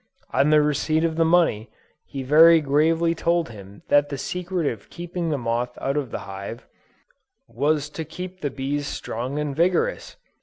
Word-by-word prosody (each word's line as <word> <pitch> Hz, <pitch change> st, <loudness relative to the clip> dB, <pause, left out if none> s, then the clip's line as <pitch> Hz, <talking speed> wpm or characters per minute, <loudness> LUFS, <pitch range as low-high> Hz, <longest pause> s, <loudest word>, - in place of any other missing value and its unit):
On 145 Hz, -, +3 dB
the 150 Hz, -1 st, +5 dB
receipt 155 Hz, +2 st, +1 dB
of 165 Hz, -1 st, 0 dB
the 165 Hz, -, +3 dB
money, 160 Hz, -10 st, +2 dB, 0.4 s
he 135 Hz, -1 st, -5 dB
very 160 Hz, +5 st, +7 dB
gravely 160 Hz, +3 st, +2 dB
told 170 Hz, -1 st, 0 dB
him 100 Hz, -2 st, -12 dB
that 145 Hz, 0 st, +4 dB
the 140 Hz, -, -4 dB
secret 180 Hz, +2 st, -3 dB
of 115 Hz, -7 st, -4 dB
keeping 175 Hz, -1 st, -4 dB
the 150 Hz, -, 0 dB
moth 120 Hz, 0 st, -2 dB
out 135 Hz, +1 st, -1 dB
of 145 Hz, -4 st, -2 dB
the -, -, -4 dB
hive, 100 Hz, +4 st, -7 dB, 0.8 s
was 145 Hz, +5 st, 0 dB
to 160 Hz, -, -5 dB
keep 180 Hz, +4 st, -8 dB
the 145 Hz, -, -1 dB
bees 140 Hz, +2 st, -3 dB
strong 125 Hz, +4 st, -4 dB
and 150 Hz, -2 st, -2 dB
vigorous! 180 Hz, -, 0 dB
150 Hz, 175 wpm, -23 LUFS, 135-165 Hz, 0.8 s, very